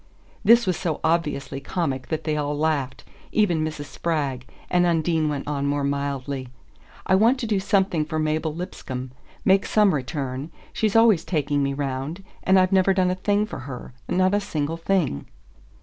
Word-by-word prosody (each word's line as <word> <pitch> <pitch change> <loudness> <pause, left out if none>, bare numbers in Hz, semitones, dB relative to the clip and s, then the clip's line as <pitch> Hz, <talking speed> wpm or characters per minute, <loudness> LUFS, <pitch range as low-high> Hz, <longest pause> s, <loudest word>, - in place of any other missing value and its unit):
This 235 +1 +6
was 185 -3 0
so 160 -3 -2
obviously 150 -5 0
comic 140 -4 -2
that 160 0 -3
they 155 -1 -1
all 145 -1 -1
laughed 145 -4 -1 0.3
even 175 -7 +2
Mrs. 155 -2 -4
Spragg 135 -3 -2 0.2
and 180 0 +3
Undine 165 -2 +1
went 145 -2 -4
on 140 -1 -1
more 145 0 0
mildly: 140 -1 -2 0.6
"I 190 - +2
want 225 +7 +5
to 240 - -2
do 210 -3 +1
something 190 -5 +1
for 155 +1 -3
Mabel 155 +1 0
Lipscomb: 130 -6 -6 0.3
make 195 +1 +5
some 210 -3 +3
return. 135 +1 -3 0.2
She's 215 -1 0
always 225 -7 +5
taking 145 -4 0
me 140 0 0
'round, 140 +6 -3 0.2
and 190 0 +4
I've 185 0 +3
never 190 0 +4
done 185 -1 +2
a - - +1
thing 205 +3 +1
for 215 - -7
her 130 -2 -8 0.2
not 185 +1 +2
a 205 - +3
single 160 -5 -3
thing." 165 - 0
155 Hz, 175 wpm, -24 LUFS, 140-185 Hz, 0.6 s, This